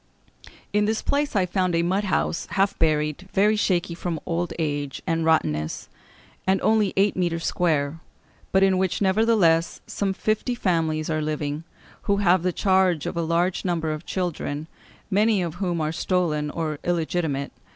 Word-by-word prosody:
In 210 0 +3
this 220 +1 -1
place 285 -3 0
I 190 -2 +3
found 180 -1 0
a 170 - +2
mud 190 +4 0
house, 180 -3 -1
half 195 0 +1
buried, 155 +3 0
very 210 +3 +4
shaky 180 -5 0
from 170 -1 -3
old 175 0 -2
age 145 -3 -3
and 165 0 0
rottenness, 75 - 0 0.6
and 190 0 +3
only 215 -3 +3
eight 200 +1 +3
mètres 170 -2 -1
square; 155 -3 0 0.5
but 190 0 +4
in 190 -1 +3
which, 190 -2 0
nevertheless, 190 -5 +3
some 195 -1 -2
fifty 215 +5 -1
families 160 -6 0
are 155 0 0
living, 150 0 -3 0.4
who 200 - +2
have 185 -3 +3
the 180 +1 0
charge 185 -4 +2
of - - -3
a 170 - 0
large 170 +3 0
number 165 -3 -1
of 155 +2 -6
children, 160 -5 -3 0.5
many 210 +1 +3
of 175 +1 -4
whom 175 -3 0
are 155 0 0
stolen 160 -3 0
or 155 -1 -3
illegitimate.... 160 -4 -1
175 Hz, 160 wpm, -24 LUFS, 160-190 Hz, 0.6 s, very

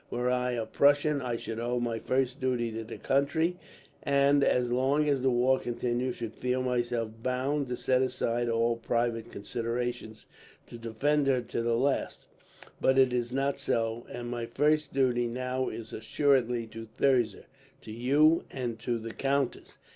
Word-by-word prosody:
Were 125 +1 0
I 125 0 0
a 115 -2 -2
Prussian, 145 +2 +3
I 120 -2 -2
should 115 0 -5
owe 120 +1 -1
my 120 -1 -2
first 130 +1 -1
duty 125 -3 0
to 115 +1 -5
the 110 - -8
country, 160 +6 +1 0.4
and 140 0 +3
as 125 -2 +2
long 135 +4 +2
as 140 -3 +2
the 130 - +3
war 130 +2 +3
continued 120 +1 -2
should 115 -2 -5
feel 125 0 -1
myself 120 -3 -1
bound 130 +3 -1
to 125 0 -3
set 130 -1 +2
aside 120 -2 0
all 115 0 +1
private 115 0 -1
considerations 115 +1 -4 0.4
to 120 - -11
defend 135 +6 0
her 130 -2 +3
to 115 0 -3
the 115 0 +1
last; 135 +3 -1 0.6
but 130 - +3
it 130 -2 +5
is 120 -1 -1
not 135 +1 0
so, 115 -3 -1
and 120 0 -6
my 120 -1 -3
first 150 +4 +1
duty 125 -3 +2
now 125 +2 -2
is 115 -1 -8
assuredly 125 0 +1
to 115 0 -9
Thirza, 120 -7 +2 0.4
to 110 - -10
you, 145 +8 +3
and 120 -4 -4
to 120 +1 -1
the 115 0 -7
countess. 140 -1 -1
125 Hz, 170 wpm, -29 LUFS, 115-135 Hz, 0.6 s, it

